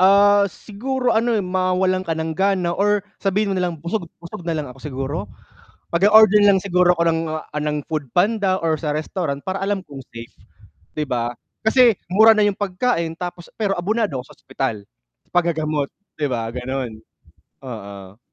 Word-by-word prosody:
Ah, 200 Hz, +1 st, +6 dB
siguro 250 Hz, +7 st, -2 dB
ano 230 Hz, +1 st, +2 dB
mawalan 185 Hz, 0 st, +1 dB
ka 165 Hz, -3 st, -2 dB
ng 160 Hz, 0 st, -2 dB
gana 190 Hz, -1 st, +1 dB
or 205 Hz, +1 st, +1 dB, 0.2 s
sabihin 200 Hz, +1 st, +1 dB
mo -, -, -1 dB
nalang 180 Hz, -3 st, -1 dB
busog 170 Hz, +2 st, -3 dB
busog 170 Hz, +1 st, -9 dB
nalang 160 Hz, -3 st, -2 dB
ako 135 Hz, -, -18 dB
siguro, 135 Hz, -1 st, -3 dB, 0.8 s
mag-o-order 210 Hz, +3 st, +6 dB
na 200 Hz, -1 st, +6 dB
lang -, -, +1 dB
siguro 180 Hz, -2 st, +3 dB
ako 170 Hz, -, +2 dB
ng, 165 Hz, 0 st, +2 dB
ah, 155 Hz, -1 st, -5 dB
ng 150 Hz, -1 st, -2 dB
Food 150 Hz, -5 st, -4 dB
Panda 195 Hz, -, +2 dB
or 165 Hz, -1 st, +1 dB
sa 150 Hz, -3 st, -1 dB
restaurant, 155 Hz, -1 st, -2 dB
para 190 Hz, +1 st, -3 dB
alam 200 Hz, 0 st, 0 dB
kong 140 Hz, -2 st, -9 dB
safe, 115 Hz, 0 st, -10 dB, 0.6 s
'di 150 Hz, -, 0 dB
ba, 120 Hz, -2 st, -1 dB, 0.3 s
kasi 235 Hz, 0 st, +5 dB, 0.2 s
mura 220 Hz, +4 st, +7 dB
na 215 Hz, -, +3 dB
yung 205 Hz, -1 st, 0 dB
pagkain 185 Hz, -4 st, 0 dB
tapos 175 Hz, 0 st, -6 dB
pero 205 Hz, -3 st, -1 dB
abonado 205 Hz, -, 0 dB
ako 125 Hz, -, -8 dB
sa -, -, -25 dB
ospital, 135 Hz, -3 st, -3 dB, 0.5 s
sa -, -, -36 dB
pag-gagamot, 155 Hz, -4 st, 0 dB, 0.3 s
'di 150 Hz, -, +1 dB
ba? 115 Hz, -4 st, -2 dB
Ganun, 125 Hz, 0 st, -4 dB, 0.7 s
oo. 100 Hz, -5 st, -9 dB
175 Hz, 170 wpm, -21 LUFS, 150-200 Hz, 0.8 s, mura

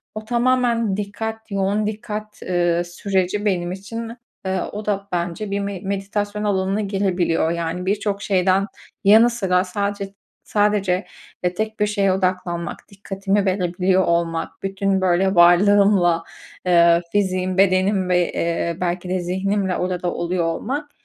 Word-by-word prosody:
o 215 Hz, 0 st, -6 dB
tamamen 240 Hz, -3 st, +1 dB
dikkat, 220 Hz, +2 st, -5 dB
yoğun 200 Hz, +2 st, 0 dB
dikkat, 215 Hz, 0 st, -6 dB
ııı, 175 Hz, -1 st, +1 dB
süreci 190 Hz, +3 st, -1 dB
benim 175 Hz, -3 st, 0 dB
için, 230 Hz, +5 st, -6 dB, 0.3 s
eee, 190 Hz, 0 st, 0 dB
o 210 Hz, +1 st, -6 dB
da 200 Hz, -1 st, -2 dB
bence 175 Hz, +3 st, -3 dB
bir 200 Hz, -, 0 dB
me 200 Hz, -1 st, -4 dB
meditasyon 205 Hz, +1 st, -3 dB
alanına 195 Hz, 0 st, 0 dB
girebiliyor. 185 Hz, -5 st, 0 dB
Yani, 170 Hz, +1 st, -3 dB
birçok 205 Hz, +1 st, -1 dB
şeyden 190 Hz, 0 st, +2 dB, 0.4 s
yanı 220 Hz, +4 st, +7 dB
sıra 190 Hz, -6 st, +1 dB
sadece 200 Hz, +1 st, -3 dB, 0.3 s
sadece, 205 Hz, -3 st, +1 dB, 0.4 s
e, 180 Hz, 0 st, +1 dB
tek 220 Hz, +3 st, -3 dB
bir 210 Hz, -, +2 dB
şeye 200 Hz, -2 st, +1 dB
odaklanmak, 180 Hz, -2 st, -2 dB
dikkatimi 195 Hz, 0 st, -2 dB
verebiliyor 185 Hz, 0 st, +1 dB
olmak, 170 Hz, -1 st, -1 dB
bütün, 195 Hz, 0 st, 0 dB
böyle, 190 Hz, +1 st, +2 dB
varlığımla, 175 Hz, 0 st, +5 dB, 0.4 s
eee, 170 Hz, -1 st, +5 dB
fiziğim, 185 Hz, -2 st, 0 dB
bedenim 190 Hz, 0 st, +3 dB
ve, 180 Hz, -1 st, +2 dB
eee, 170 Hz, 0 st, -1 dB
belki 180 Hz, 0 st, -2 dB
de 185 Hz, 0 st, 0 dB
zihnimle 190 Hz, +2 st, -1 dB
orada 180 Hz, -1 st, -2 dB
da 175 Hz, -1 st, -1 dB
oluyor 175 Hz, 0 st, -1 dB
olmak, 270 Hz, -, -3 dB
195 Hz, 135 wpm, -21 LUFS, 180-205 Hz, 0.4 s, yanı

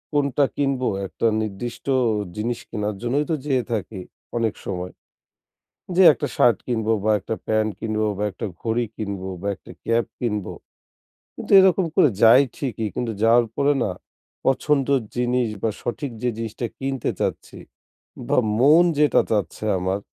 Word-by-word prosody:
কোনটা 140 Hz, 0 st, +2 dB
কিনব 135 Hz, -2 st, 0 dB, 0.3 s
একটা 115 Hz, -, -1 dB
নির্দিষ্ট 110 Hz, +3 st, -5 dB, 0.5 s
জিনিস 115 Hz, +2 st, -2 dB
কেনার 105 Hz, -2 st, -3 dB
জন্যই 135 Hz, +5 st, 0 dB
তো -, -, +2 dB
যেয়ে 130 Hz, -4 st, +1 dB
থাকি 105 Hz, -2 st, -3 dB, 0.4 s
অনেক 115 Hz, -2 st, 0 dB
সময়। 90 Hz, -1 st, -4 dB, 1.0 s
যেয়ে 185 Hz, 0 st, +8 dB
একটা 115 Hz, -, -3 dB
শার্ট 120 Hz, -, +4 dB
কিনব 110 Hz, -3 st, -2 dB, 0.2 s
বা 110 Hz, -, +2 dB
একটা 115 Hz, -, -4 dB
প্যান্ট 110 Hz, 0 st, +1 dB
কিনব 110 Hz, -1 st, -2 dB, 0.2 s
বা 105 Hz, -, -1 dB
একটা -, -, -5 dB
ঘড়ি 115 Hz, +1 st, 0 dB
কিনব 100 Hz, -3 st, -4 dB, 0.2 s
বা 100 Hz, -, -2 dB
একটা -, -, -14 dB
ক্যাপ 115 Hz, 0 st, +2 dB
কিনব। 105 Hz, -6 st, -2 dB, 0.9 s
কিন্তু -, -, -7 dB
এরকম 190 Hz, -1 st, +4 dB
করে 145 Hz, -, +5 dB
যাই 120 Hz, +5 st, +8 dB
ঠিকই, 115 Hz, -5 st, -3 dB
কিন্তু 120 Hz, -2 st, -2 dB
যাওয়ার 115 Hz, +1 st, +5 dB
পরে 145 Hz, +1 st, +3 dB
না 100 Hz, -, -1 dB, 0.5 s
পছন্দের 135 Hz, 0 st, +2 dB
জিনিস 125 Hz, -1 st, +1 dB
বা 115 Hz, -, +2 dB
সঠিক 135 Hz, +3 st, -4 dB
যে 125 Hz, -, +2 dB
জিনিসটা 115 Hz, +1 st, -4 dB
কিনতে 135 Hz, -2 st, -2 dB
চাচ্ছি -, -, -3 dB, 0.7 s
বা -, -, +1 dB, 0.2 s
মন 150 Hz, +6 st, +6 dB
যেটা 150 Hz, -3 st, +4 dB
চাচ্ছে 105 Hz, 0 st, -1 dB
আমার। 95 Hz, +2 st, -1 dB
120 Hz, 150 wpm, -23 LUFS, 110-135 Hz, 1.0 s, যেয়ে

